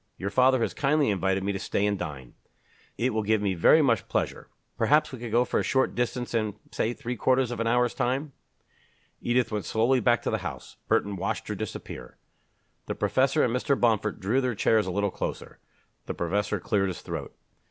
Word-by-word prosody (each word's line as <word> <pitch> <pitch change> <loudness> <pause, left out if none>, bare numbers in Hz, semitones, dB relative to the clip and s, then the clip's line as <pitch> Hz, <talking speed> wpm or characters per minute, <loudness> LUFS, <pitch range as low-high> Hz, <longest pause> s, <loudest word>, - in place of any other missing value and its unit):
Your 100 +2 -4
father 130 +3 +4
has - - 0
kindly 145 -3 +2
invited 95 0 0
me 100 - 0
to 100 - -3
stay 100 - -1
and 105 0 +1
dine. 75 -9 -7 0.6
It 125 +2 +1
will 110 - +1
give 110 +1 +2
me 100 -2 0
very 120 - +5
much 115 -7 +1
pleasure. - - -2 0.3
Perhaps 150 +1 +3
we 130 - -8
could 120 0 -5
go 120 +2 +3
for - - 0
a - - 0
short 130 -1 +1
distance 120 0 -2
in 110 -3 0 0.2
say 110 - 0
three 125 -1 -5
quarters 130 0 +2
of 120 - -4
an 115 - 0
hour's 125 +1 +2
time?" 135 +4 -1 0.9
Edith 120 0 +1
went 105 -4 -2
slowly 120 +6 +2
back 120 -2 +2
to - - -1
the - - 0
house. - - -7
Burton 100 -1 +1
watched 95 - -3
her - - -1
disappear. 65 - -7 0.7
The - - -3
professor 135 +3 +2
and 120 -1 +1
Mr. 135 +2 +1
Bomford 110 -3 +1
drew 110 +8 +1
their 125 -3 -1
chairs 110 0 +2
a - - -2
little 100 +1 0
closer. - - -5 0.5
The - - -3
professor 100 +4 -1
cleared 100 0 0
his 95 - -5
throat. - - -5
"Mr. - - -44
115 Hz, 205 wpm, -27 LUFS, 100-125 Hz, 0.9 s, very